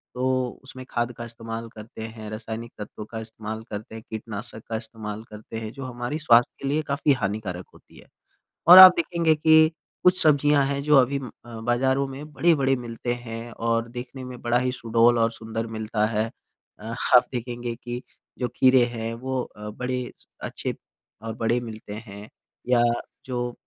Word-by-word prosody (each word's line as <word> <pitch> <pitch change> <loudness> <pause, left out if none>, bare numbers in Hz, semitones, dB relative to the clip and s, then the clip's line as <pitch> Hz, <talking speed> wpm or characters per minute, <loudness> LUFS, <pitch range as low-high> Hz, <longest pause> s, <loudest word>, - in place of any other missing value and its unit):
तो 130 -1 -1
उसमें 130 -1 -10
खाद 120 0 -1
का 120 - -5
इस्तेमाल 115 0 -6
करते 110 +1 -10
हैं, 110 -1 -8
रासायनिक 110 +1 -6
तत्वों 105 0 -7
का 110 0 -7
इस्तेमाल 110 0 -6
करते 110 +1 -7
हैं, 110 - -8
कीटनाशक 110 0 -6
का 115 - -2
इस्तेमाल 110 -1 -6
करते 105 +1 -9
हैं, 110 -1 -6
जो 135 -1 -8
हमारी 125 +3 -4
स्वास्थ्य 120 -6 +5
के 135 - -3
लिए 150 +3 +1
काफ़ी 140 +1 +2
हानिकारक 100 -6 -3
होती - - -19
है। - - -17 0.6
और 180 +2 +12
आप 185 -1 +13
देखेंगे 170 -1 +2
कि 160 +1 +5 0.3
कुछ 185 0 +5
सब्ज़ियाँ 145 -2 +4
हैं 140 0 -1
जो 150 0 +4
अभी 135 +2 +4
अम, 130 -3 -7 0.2
अ, 115 -1 -8
बाज़ारों 130 +3 +1
में 145 +3 -9
बड़े-बड़े 140 -5 +3
मिलते 120 0 -4
हैं, 120 -1 -7
और 115 0 -1
देखने 125 +2 -7
में 125 -1 -9
बड़ा 120 +1 +2
ही 125 0 0
सुडौल 115 0 +3
और 115 0 +3
सुंदर 115 0 -5
मिलता 110 0 0
है। 110 0 0 0.5
अ, 110 +2 -6
आप 125 0 +5
देखेंगे 120 -1 -4
कि 120 0 -6 0.4
जो 125 - 0
खीरे 130 -1 +6
हैं, 115 -1 -4
वो 130 +2 -3
अ, 105 0 -9
बड़े 125 +3 -3 0.3
अच्छे - - -4 0.5
और 110 0 -4
बड़े 115 +2 +1
मिलते 110 -3 -8
हैं, 100 +1 -10 0.4
या 120 -1 +5 0.4
जो 120 -1 -3
120 Hz, 175 wpm, -25 LUFS, 110-130 Hz, 0.6 s, आप